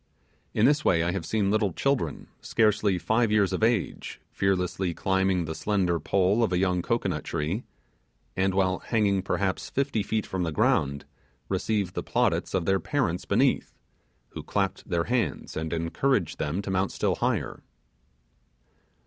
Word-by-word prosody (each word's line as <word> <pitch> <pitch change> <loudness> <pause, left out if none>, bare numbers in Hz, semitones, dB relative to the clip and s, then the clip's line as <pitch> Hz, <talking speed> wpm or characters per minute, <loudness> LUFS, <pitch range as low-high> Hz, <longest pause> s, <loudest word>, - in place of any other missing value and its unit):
In 105 - +4
this 145 +3 +3
way 85 -2 +3
I 85 - 0
have 90 -4 -4
seen 100 0 +1
little 105 -4 +1
children, 130 - -1 0.2
scarcely 105 -3 +2
five 110 +4 +1
years 100 -3 +3
of - - -2
age, 115 -3 0
fearlessly 95 -2 0
climbing 95 -2 +1
the 80 - -4
slender 90 -2 0
pole 95 +7 +2
of 110 - +1
a 90 - +2
young 90 -1 +1
cocoanut - - -1
tree, 80 +8 -3 0.7
and 95 0 +1
while 95 -1 +2
hanging 100 -4 +1
perhaps 95 0 -2
fifty 135 -5 0
feet 110 +1 -1
from 95 - -3
the 85 -2 -1
ground, 70 -1 +1 0.4
receiving 105 -5 0
the - - -2
plaudits 105 -10 0
of 90 -3 0
their 95 +1 +2
parents 110 - -1
beneath, - - +1 0.5
who - - -7
clapped 100 0 -2
their 85 -2 +1
hands, 115 - -2
and 80 0 -3
encouraged 85 - 0
them 85 +7 -2
to 95 - -4
mount 95 +1 0
still - - 0
higher. - - -1
95 Hz, 155 wpm, -27 LUFS, 85-105 Hz, 0.7 s, In